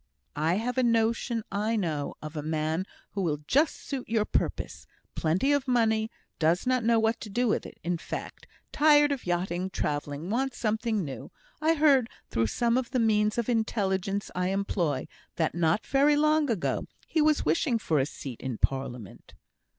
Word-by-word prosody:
"I 160 +4 +1
have 245 +5 -1
a - - +4
notion 230 0 +1
I 215 +3 0
know 160 -8 -2
of 155 +1 -7
a 150 - -2
man 155 +4 -1 0.2
who 200 - -3
will 150 -5 -1
just 295 - +3
suit 270 -5 -6
your 220 -2 +2
purpose. - - -2 0.3
Plenty 180 - +1
of 285 -2 +1
money 220 -3 +2 0.3
does 165 +6 +2
not 255 -1 +2
know 230 0 +4
what 225 +1 +1
to 215 - -7
do 245 +5 +1
with 215 - 0
it, - - -14
in 175 -1 -1
fact - - -7 0.2
tired 295 -1 +5
of 270 -8 -3
yachting, 175 +1 -1
travelling; 145 +1 -3
wants 265 +2 -1
something 220 -3 0
new. 135 -2 -7 0.3
I 320 +1 +3
heard, 280 -6 +4 0.2
through 115 0 +1
some 235 - +1
of 250 - -5
the 255 - 0
means 215 -1 +2
of 235 - 0
intelligence 200 -4 0
I 180 0 0
employ, 185 -7 -1 0.3
that 160 -2 0
not 165 +4 +1
very 285 +2 +4
long 305 0 +3
ago 210 -7 -1 0.2
he 320 - +1
was 305 0 +3
wishing 165 - +2
for 160 -9 0
a 135 - +1
seat 130 -5 -8
in 130 -3 -4
Parliament." 125 -6 -3
215 Hz, 180 wpm, -28 LUFS, 165-245 Hz, 0.3 s, tired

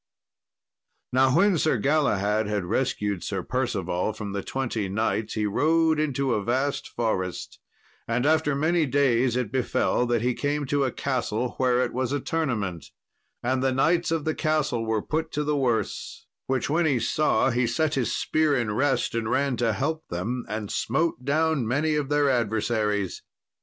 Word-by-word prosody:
Now 130 +1 +4
when 190 0 +4
Sir 155 -4 +2
Galahad 110 -6 +1
had 105 -3 -1
rescued 105 -3 -1
Sir 95 -3 -3
Percival 105 -6 -1
from 105 -2 -6
the 100 - -2
twenty 115 -6 -3
knights 110 +2 -1
he 110 -1 0
rode 160 +8 +2
into 140 -4 0
a 105 - -1
vast 130 +5 -1
forest. 95 -6 -3 0.5
And 120 +3 0
after 155 -1 +2
many 160 +2 +2
days 130 -3 +2
it 125 -5 -1
befell 125 -1 +1
that 120 -1 +1
he 125 0 +2
came 145 +3 -1
to 140 +1 +1
a 130 - -1
castle 125 -3 -2
whereat 125 -1 +2
was 130 0 -1
a 145 - 0
tournament. 115 - -2 0.6
And 130 +1 0
the 135 0 +2
knights 165 +7 +2
of 165 -2 -1
the 155 - +1
castle 150 -8 0
were 110 -2 0
put 160 +1 -2
to 150 - 0
the 150 0 0
worse; 125 -5 -2 0.2
which 130 -1 0
when 160 +3 +2
he 135 -5 +2
saw, 130 0 +2
he 120 0 +1
set 155 +6 0
his 130 -5 0
spear 155 -2 +1
in 115 -4 -1
rest 135 +4 +1
and 115 -1 -2
ran 140 0 +1
to 115 -2 +1
help 160 +10 -2
them, 115 +9 -3
and 105 -1 -4
smote 165 -5 -1
down 155 -3 +1
many 150 +6 +1
of 150 -2 -1
their 145 -1 +3
adversaries. 110 -4 0
130 Hz, 170 wpm, -25 LUFS, 110-150 Hz, 0.6 s, Now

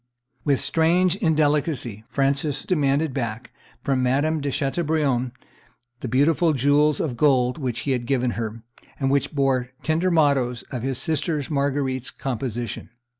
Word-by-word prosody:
With 140 -3 +2
strange 175 +2 +2
indelicacy 150 - 0
Francis 140 +1 0
demanded 145 -3 +1
back 120 -2 -4 0.3
from 135 -2 +1
Madame 145 +5 +1
de 140 - -1
Chateaubriant 140 -3 0 0.7
the 130 - -5
beautiful 155 +6 +3
jewels 145 +2 +3
of 135 -6 -2
gold 125 0 +2
which 125 -4 -2
he 140 - -2
had 120 -2 -1
given 125 -2 +1
her, 115 0 -5 0.4
and 135 -1 +1
which 140 +1 0
bore 135 -3 +1
tender 160 +4 +1
mottoes 140 -7 +2
of 125 -4 -4
his 130 0 -2
sister 155 +1 -1
Marguerite's 140 -2 -1
composition. 120 -3 -4
140 Hz, 135 wpm, -23 LUFS, 125-150 Hz, 0.7 s, beautiful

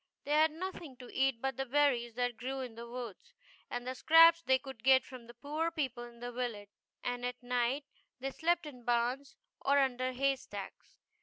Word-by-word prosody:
They 290 - -5
had 310 +1 +5
nothing 325 -4 -7
to 250 -1 -11
eat 265 -3 +1
but 270 0 -1
the 270 - -1
berries 250 -4 +2
that 245 -1 0
grew 265 +3 -4
in 250 -3 -6
the 235 +1 -9
woods, 245 - -8 0.3
and 245 0 -4
the 255 - -2
scraps 330 +4 +7
they 260 -5 +3
could 265 -4 -11
get 260 0 +6
from 250 -3 -11
the 240 - -12
poor 300 +6 -2
people 270 -7 -3
in 235 -1 -14
the 245 0 -4
village, 235 -5 -4 0.3
and 245 0 -2
at 245 0 -4
night 250 +3 0 0.3
they 270 +1 -3
slept 340 +3 +1
in 255 -5 -10
barns 245 +4 0 0.2
or 280 +1 +3
under 255 -2 +1
hay 270 +1 +1
stacks. 205 -5 -9
255 Hz, 200 wpm, -33 LUFS, 245-280 Hz, 0.3 s, scraps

